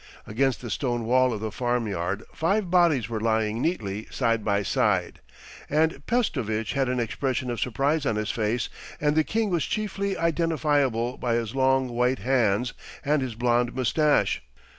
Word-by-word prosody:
Against 130 +2 0
the 120 -3 -6
stone 120 -3 -1
wall 130 +2 +3
of 110 -3 -4
the 110 -1 -3
farm 120 0 -1
yard 95 +2 -2
five 190 +2 0
bodies 170 - +4
were 115 -1 -3
lying 110 0 0
neatly 110 - -2
side 115 -3 0
by 100 -1 +1
side, - - 0 0.5
and 160 +3 +1
Pestovitch 120 - 0
had 135 -2 +1
an 125 0 0
expression 125 +1 -2
of 120 - -4
surprise 140 +5 0
on - - +1
his 105 0 -1
face 115 +2 -1 0.3
and 150 0 +1
the 155 - +4
king 220 +3 -1
was 170 -3 +1
chiefly 200 -2 -2
identifiable 150 -7 +1
by 120 -2 0
his 115 -2 -2
long 130 0 +2
white 125 +2 +1
hands 120 -1 +1 0.3
and 145 0 +2
his 125 -4 -4
blonde 120 +1 +1
moustache. 145 +4 +2
125 Hz, 165 wpm, -26 LUFS, 115-150 Hz, 0.5 s, bodies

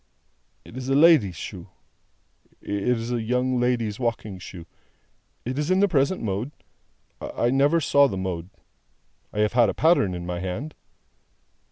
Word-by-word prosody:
"It - - -13
is 130 0 -5
a 135 - +2
lady's 145 - +5
shoe. - - -8 0.9
It 100 +1 -3
is 115 +2 -4
a 120 -1 -1
young 125 +2 0
lady's 120 -3 0
walking 110 -5 -3
shoe. 90 -2 -10 0.8
It 130 +4 -3
is 150 +2 -1
in 185 +1 +3
the 205 - +4
present 145 0 +1
mode. 105 +4 -2 0.7
I 120 - -1
never 140 +5 +3
saw 140 -2 +4
the 95 - -4
mode. 90 -2 -4 0.8
I 105 - -1
have 105 +1 +1
had 120 -3 +4
a - - -3
pattern 155 - +3
in 85 0 -6
my 90 0 -3
hand." 100 - -4
120 Hz, 160 wpm, -24 LUFS, 100-140 Hz, 0.9 s, lady's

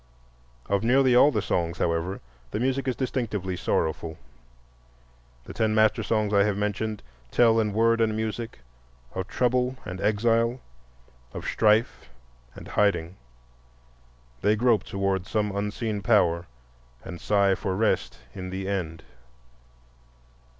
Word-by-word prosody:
Of 100 +1 0
nearly 130 +1 +4
all 135 +4 +7
the 110 -8 -1
songs, 85 -3 -1
however, 85 +3 -1 0.3
the 105 - -3
music 135 +2 0
is 130 - 0
distinctly 110 -8 -2
sorrowful. 80 -1 -2 1.3
The - - -10
ten 110 -1 0
master 110 -1 +3
songs 110 -2 0
I 100 -1 +5
have 105 -1 0
mentioned 105 +1 -2 0.3
tell 115 - +4
in 105 -1 +1
word 115 +2 +2
and 110 -1 +1
music 110 - -4 0.5
of 95 0 -4
trouble 125 +1 0
and 95 -2 -6
exile, 115 +3 +2 0.8
of - - -6
strife 110 - +1 0.5
and - - -10
hiding; 95 -4 +1 1.3
they 105 +2 +3
grope 115 -3 +2
toward 95 -1 -1
some 105 -2 -1
unseen 105 +1 -2
power 85 -6 +2 0.6
and 90 -3 -8
sigh 100 -2 +3
for 95 -1 -2
rest 110 +2 0 0.2
in 90 -1 -6
the 95 +1 -4
End. 85 -5 -3
105 Hz, 130 wpm, -26 LUFS, 95-115 Hz, 1.3 s, all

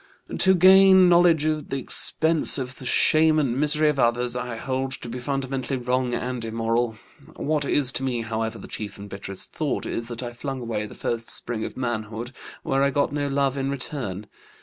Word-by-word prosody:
To 190 0 +4
gain 190 0 +7
knowledge 170 -3 +4
at 155 -1 -2
the 135 - -2
expense 160 +5 +3
of 130 -1 -5
the 130 - -7
shame 155 +3 +4
and 135 -6 +1
misery 150 +2 +2
of 150 -2 0
others 120 +1 +1
I 125 -1 -4
hold 130 +3 -3
to - - -7
be 125 +2 -5
fundamentally 135 0 -3
wrong 125 0 -1
and 125 -1 -4
immoral. 115 0 -1 0.4
What 150 -1 -1
is 140 -2 +3
to 135 - -2
me, 125 -3 -2
however, 110 0 -3
the - - -10
chief 105 -2 -6
and 100 0 -9
bitterest 100 -1 -7
thought 150 -4 -2
is 115 - -4
that 120 +1 -7
I 120 0 -6
flung 135 +2 -5
away 110 -3 -4
the - - -12
first 115 -1 -3
spring 115 -2 -2
of - - -7
manhood 115 -1 -4 0.3
where 135 0 0
I 140 - +3
got 140 +1 0
no 145 -1 -1
love 140 -1 0
in 135 0 -2
return. 130 - -3
130 Hz, 195 wpm, -24 LUFS, 120-145 Hz, 0.4 s, gain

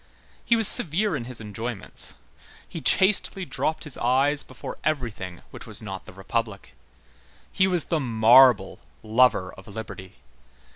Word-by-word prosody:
He 235 - +2
was 225 -3 +4
severe 180 +4 +2
in 120 -4 -5
his 125 -1 -7
enjoyments. 110 0 -4 0.5
He - - -8
chastely 190 -1 +3
dropped 160 -1 -3
his 150 -4 -4
eyes 135 +4 +2
before 130 - -10
everything 115 - -4
which - - -11
was 105 -1 +1
not 95 -4 -8
the - - -10
Republic. 100 +2 -5 0.8
He 190 - +2
was 180 -4 +2
the 165 - -2
marble 120 -3 +4 0.2
lover 110 -4 +2
of 95 - -15
liberty. 100 -3 -9
120 Hz, 140 wpm, -24 LUFS, 105-150 Hz, 0.8 s, was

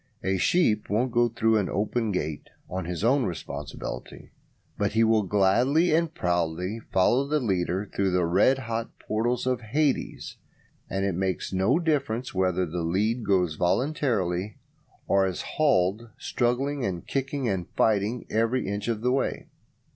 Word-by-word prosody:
A 95 0 +1
sheep 110 - +2
won't 120 +5 +1
go 120 0 +3
through 110 -1 +2
an 100 -3 0
open 110 +2 -1
gate 80 -5 -3 0.2
on 95 -1 -4
his 90 +2 -4
own 130 +4 +3
responsibility, 75 -4 -6 0.4
but - - -1
he 115 +1 +4
would 110 -4 +2
gladly 125 - +3
and 165 0 +2
proudly 90 - -1
"follow 120 +9 +3
the 150 +1 +1
leader" 95 -3 -1
through 100 -1 +1
the 90 -1 +2
red 100 +10 +4
hot 115 -2 -4
portals 120 +3 -1
of 125 -1 0
Hades: 140 +6 -1 0.5
and 95 +1 -1
it 100 - 0
makes 95 +1 -2
no 95 - +3
difference 140 -8 -1
whether 95 -1 +1
the 85 +1 -4
lead 105 +8 0
goes 90 -6 +2
voluntarily, 100 - 0 0.5
or 95 -1 +3
is 90 - -4
hauled 115 -6 +1
struggling 135 +3 -1
and 90 -5 -3
kicking 135 -1 -2
and 95 -5 -2
fighting 110 +2 +1
every 115 +3 0
inch 100 +2 -3
of 115 -2 -1
the 125 +1 +1
way. 135 +1 -1
110 Hz, 155 wpm, -26 LUFS, 95-125 Hz, 0.5 s, he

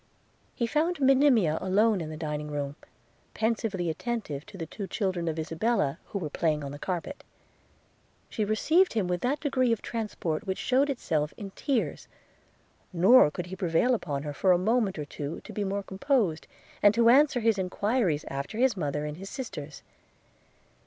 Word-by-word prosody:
– - - -39
He 235 - 0
found 315 +8 0
Monimia 260 - +4
alone 200 +2 +2
in 155 - -5
the 155 - -7
dining 150 -1 -4
room, 145 -1 -3 0.6
pensively 220 -5 -1
attentive 165 - -4
to 210 -2 -11
the 165 - -4
two 195 +4 -7
children 185 -6 -2
of 160 0 -2
Isabella, 165 -1 0
who - - -5
were 175 -6 -3
playing 155 -2 0
on 140 - -5
the 145 - -8
carpet. 185 - -4 0.5
– - - -38
She 215 - -1
received 315 - +3
him 215 -5 0
with 180 -1 -1
that 275 +4 0
degree 255 -5 +1
of 230 - +1
transport 205 -9 -3
which 190 - -1
shewed 270 +3 +2
itself 155 - -1
in 200 -2 -7
tears; 265 +3 -2 0.8
nor 185 +1 +6
could 175 +4 -5
he 180 +1 -7
prevail 190 +7 +2
upon 145 - -2
her 145 -1 -4
for 185 +6 +2
a - - +4
moment 210 0 +1
or 150 - -4
two 145 +1 -6
to - - -11
be 210 - -2
more 200 +1 -2
composed, 195 - 0 0.3
and 205 0 +6
to 230 0 +5
answer 275 +1 +5
his 225 -3 +2
enquiries 190 - 0
after 140 +10 -5
his 250 -2 +3
mother 150 -4 -2
and 150 +1 -5
his 195 +2 -8
sisters. 155 - -7
195 Hz, 180 wpm, -28 LUFS, 160-235 Hz, 0.8 s, nor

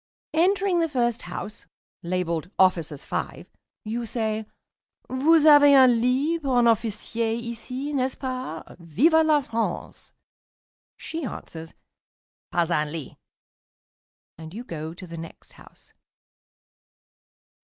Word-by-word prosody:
Entering 370 +2 +2
the 330 -1 +1
first 240 -4 0
house 205 -3 -8 0.3
(labeled 175 -1 -2
"Officers 165 -6 +2
5") - - -4 0.4
you 230 +2 -3
say, 220 -2 -2 0.6
"Vous 305 +5 +3
avez 290 -2 +8
un 250 -3 +6
lit 280 +7 +1
pour 265 -4 0
un 240 - +4
Officier 225 0 0
ici, 240 +5 -5
n'est 260 -2 +1
ce - - -11
pas? 255 - -5 0.2
Vive 275 - +3
la 305 -2 +3
France!" 230 -2 -4 0.9
She 325 0 -6
answers, 165 -9 -8 0.8
"Pas 175 -1 0
un 150 -2 0
lit," 160 -3 -6 1.2
and 160 +3 -10
you 235 - -6
go 160 -6 -6
to 185 - -10
the 165 -1 -9
next 165 0 -11
house. - - -18
235 Hz, 120 wpm, -25 LUFS, 175-280 Hz, 1.2 s, avez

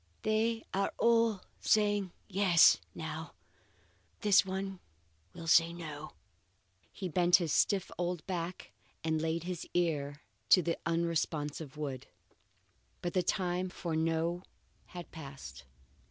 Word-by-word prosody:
They 225 +1 +1
are 195 +1 +1
all 230 -4 +3 0.2
saying 205 -3 +2 0.2
Yes! 185 -4 +5 0.2
now; 160 +1 -6 0.8
but - - -39
this 200 -4 +6
one 190 0 -4 0.6
will 165 - -8
say 165 +1 +5
No!" 155 -4 -7 0.8
he 190 - -5
bent 175 +1 +4
his 165 -5 +2
stiff 195 -3 +2
old 175 -2 -2
back 175 -1 -4 0.3
and 160 -1 0
laid 165 +1 -1
his 180 -1 -5
ear 145 -4 0 0.3
to 180 - +7
the 170 0 -1
unresponsive 160 -3 -1
wood. 135 -4 -5 1.0
But 175 - -2
the 185 - +3
time 180 0 -1
for 170 -2 -4
no 165 +2 0 0.5
had 175 -1 -9
passed. 135 - -9
175 Hz, 125 wpm, -32 LUFS, 160-190 Hz, 1.0 s, to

